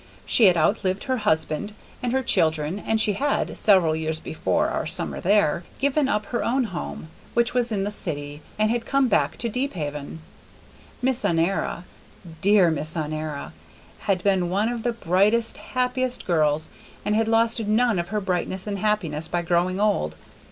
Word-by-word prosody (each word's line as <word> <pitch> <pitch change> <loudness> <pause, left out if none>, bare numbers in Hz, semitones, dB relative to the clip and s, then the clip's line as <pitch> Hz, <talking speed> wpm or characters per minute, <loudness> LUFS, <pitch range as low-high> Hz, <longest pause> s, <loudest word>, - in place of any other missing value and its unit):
She 230 - +4
had 180 -3 +6
outlived 190 +3 +1
her 260 -1 -1
husband 205 -1 0 0.3
and 245 - -1
her 265 +1 +1
children, 160 -2 +1
and 220 +1 0
she 215 -1 +2
had, 280 +8 -1
several 185 -7 +4
years 160 0 -2
before 95 - -1
our - - -2
summer - - -2
there, 185 -4 +2
given 280 0 +1
up 210 -3 0
her 235 +3 -2
own 260 +3 +1
home, 75 - -6 0.3
which 235 0 +2
was 245 -1 +1
in 200 -3 0
the 205 - -2
city, 145 -6 -4 0.2
and 215 +1 +2
had 235 -1 -2
come 275 -1 +3
back 210 -3 +1
to 235 - 0
Deephaven. 165 - -3 0.9
Miss 260 -1 +1
Honora 170 +1 0 0.6
dear 195 -4 +5
Miss 155 +2 -3
Honora! 155 -1 -4 0.5
had 190 -4 -1
been 190 -3 +2
one 205 +5 +1
of 240 -1 -3
the 240 +1 -1
brightest, 215 +3 +1
happiest 255 0 -1
girls, 155 -3 +1 0.3
and 210 - +1
had 225 0 +2
lost 230 +1 +3
none 220 -1 +2
of 170 - -2
her 210 +3 -1
brightness 190 -1 -2
and 200 -2 -3
happiness 175 -7 -1
by 175 +1 -1
growing 175 +2 +1
old. 80 - +1
200 Hz, 170 wpm, -24 LUFS, 160-230 Hz, 0.9 s, had